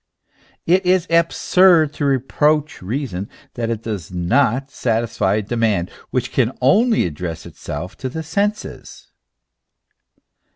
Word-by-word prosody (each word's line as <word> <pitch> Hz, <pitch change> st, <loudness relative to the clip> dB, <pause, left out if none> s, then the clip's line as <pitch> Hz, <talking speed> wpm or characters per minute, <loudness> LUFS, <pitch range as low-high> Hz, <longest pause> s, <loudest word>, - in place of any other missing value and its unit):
It 185 Hz, +3 st, +3 dB
is 180 Hz, -1 st, +2 dB
absurd 170 Hz, -1 st, +4 dB
to 145 Hz, -, -2 dB
reproach 145 Hz, +3 st, +1 dB
reason, 100 Hz, -2 st, -4 dB, 0.2 s
that 115 Hz, -1 st, -3 dB
it 115 Hz, -1 st, -3 dB
does 100 Hz, -8 st, -5 dB
not 125 Hz, +9 st, +1 dB
satisfy 115 Hz, -4 st, 0 dB
a 110 Hz, -, 0 dB
demand 110 Hz, -5 st, 0 dB, 0.2 s
which 125 Hz, -, -2 dB
can 130 Hz, -1 st, +1 dB
only 215 Hz, -, +3 dB
address 80 Hz, 0 st, -5 dB
itself 85 Hz, +2 st, -7 dB
to 130 Hz, -, -4 dB
the 160 Hz, +5 st, -5 dB
senses. 200 Hz, +7 st, -3 dB
125 Hz, 120 wpm, -20 LUFS, 100-155 Hz, 0.2 s, absurd